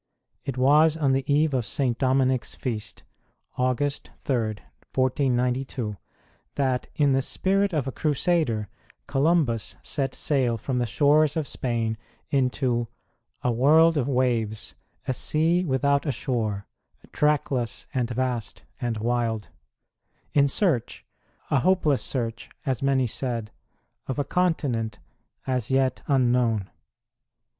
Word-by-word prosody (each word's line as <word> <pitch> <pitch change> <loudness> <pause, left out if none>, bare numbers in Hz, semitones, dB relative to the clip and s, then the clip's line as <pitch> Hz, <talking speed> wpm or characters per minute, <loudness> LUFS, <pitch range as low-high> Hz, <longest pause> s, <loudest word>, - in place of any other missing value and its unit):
It 135 -2 -4
was 150 +5 +5
on 145 -4 +2
the 135 +1 0
eve 150 +1 +3
of 125 -2 +1
St. 125 +1 -1
Dominic 130 0 +2
s - - -7
Feast 110 -4 -5 0.5
August 130 +3 -1
3, 120 -5 0 0.5
1492 125 -3 0 0.6
that, 130 -3 0
in 145 -2 +3
the 135 - +3
spirit 195 +7 +1
of 150 -6 0
a - - -2
Crusader, 150 - 0 0.4
Columbus 135 - +1
set 135 -3 -1
sail 130 -6 +1
from 125 +3 -2
the 120 - 0
shores 145 +5 +3
of 155 - 0
Spain 115 -4 -1 0.3
into 125 -3 +1 0.6
A 125 - +2
world 155 +7 +5
of 140 -4 0
waves, 120 -5 0 0.3
a 130 - +1
sea 165 +7 +1
without 140 0 +1
a - - +2
shore, 110 -5 -2 0.5
Trackless 140 -5 0
and 125 -3 0
vast 125 -2 -2 0.2
and 120 -2 -2
wild, 115 -1 -1 0.8
in 140 -1 +5
search 155 - 0 0.5
a 140 - +4
hopeless 160 -4 +2
search, 120 -2 -3 0.2
as 130 -4 -1
many 135 -1 +2
said 115 -2 -3 0.6
of 130 - -3
a 145 - +1
continent 135 - 0 0.5
as 125 -3 -1
yet 130 -1 +1
unknown. 120 -6 +2
130 Hz, 125 wpm, -25 LUFS, 120-145 Hz, 0.8 s, was